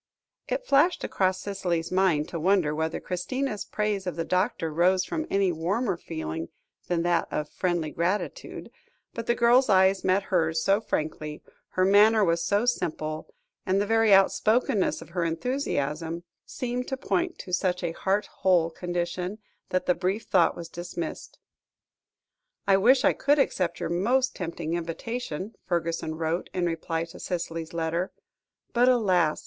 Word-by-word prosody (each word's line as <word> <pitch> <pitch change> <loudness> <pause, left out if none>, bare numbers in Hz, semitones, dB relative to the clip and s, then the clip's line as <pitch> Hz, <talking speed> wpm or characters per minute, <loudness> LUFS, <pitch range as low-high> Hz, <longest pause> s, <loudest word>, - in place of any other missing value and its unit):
It - - -2
flashed 300 - +3
across 185 -1 0
Cicely's 175 -4 -2
mind 185 -5 +2
to 170 - -4
wonder 180 -3 +2
whether 160 +1 -2
Christina's 210 +6 -3
praise 210 -3 -2
of 180 - -2
the 165 0 -2
doctor 180 -4 0
rose 185 +3 +3
from 315 -1 -3
any 195 -2 +2
warmer 190 +6 -1
feeling 85 - -5 0.4
than 170 -1 0
that 175 -1 +1
of 150 0 -3
friendly 175 -4 -1
gratitude, 190 - -3 0.4
but 230 -1 -6
the 235 - +3
girl's 245 +2 +4
eyes 190 0 +4
met 190 +1 +2
hers 165 -2 +2
so 200 +2 +3
frankly, 155 -6 -3 0.3
her 185 - +3
manner 210 +2 +6
was 170 -1 +1
so 200 +6 +1
simple, 155 -9 -2 0.3
and 190 0 +1
the 205 - +1
very 225 0 +3
outspokenness 210 +3 +3
of - - -17
her 175 0 -1
enthusiasm, 165 - -2 0.2
seemed 250 0 -3
to 265 - -3
point 350 +5 -1
to 180 - -9
such 180 0 0
a 170 - 0
heart 195 +4 0 0.2
whole 175 -3 +3
condition, 175 +3 -3 0.3
that 185 - 0
the 180 - +4
brief 185 +5 -1
thought - - +3
was 170 - -7
dismissed. 170 -1 -6 1.3
"I 195 - +5
wish 250 +7 +5
I - - +5
could 290 +2 +2
accept 180 - 0
your - - -2
most 245 +10 +1
tempting 170 -2 -4
invitation," 185 +3 -4
Fergusson 165 -2 -1
wrote, 165 +2 -2
in 180 -1 +1
reply 165 0 -2
to 165 - -13
Cicely's 165 -2 -4
letter; 170 +2 -1 0.6
"but, 245 +1 +4
alas! 185 -10 +3
185 Hz, 155 wpm, -27 LUFS, 165-210 Hz, 1.3 s, manner